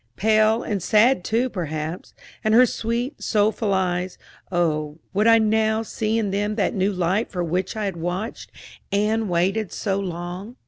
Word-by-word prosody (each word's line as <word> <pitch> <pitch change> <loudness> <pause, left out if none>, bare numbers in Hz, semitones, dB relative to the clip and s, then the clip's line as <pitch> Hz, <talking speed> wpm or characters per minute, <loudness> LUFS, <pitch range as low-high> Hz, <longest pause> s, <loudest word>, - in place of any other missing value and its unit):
Pale, 215 - +3
and 205 -4 -2
sad 215 +2 +4
too 230 +6 +1
perhaps; 160 - -5 0.3
and 215 0 +3
her 250 +2 +8
sweet, 235 +3 -3
soulful 215 0 +1
eyes 185 -1 -1 0.3
oh, 155 -4 0 0.2
would 210 +3 +2
I 230 0 +7
now 220 0 +2
see 220 0 -2
in 210 -3 0
them 205 +2 -1
that 210 - 0
new 195 +1 +1
light 185 +3 0
for 180 -3 -3
which 180 +4 -2
I 215 -1 -2
had 190 -3 -3
watched 180 +7 -4 0.4
and 210 +1 +1
waited 185 +4 0
so 195 -2 -1
long? 180 +4 -6
205 Hz, 165 wpm, -23 LUFS, 180-220 Hz, 0.4 s, her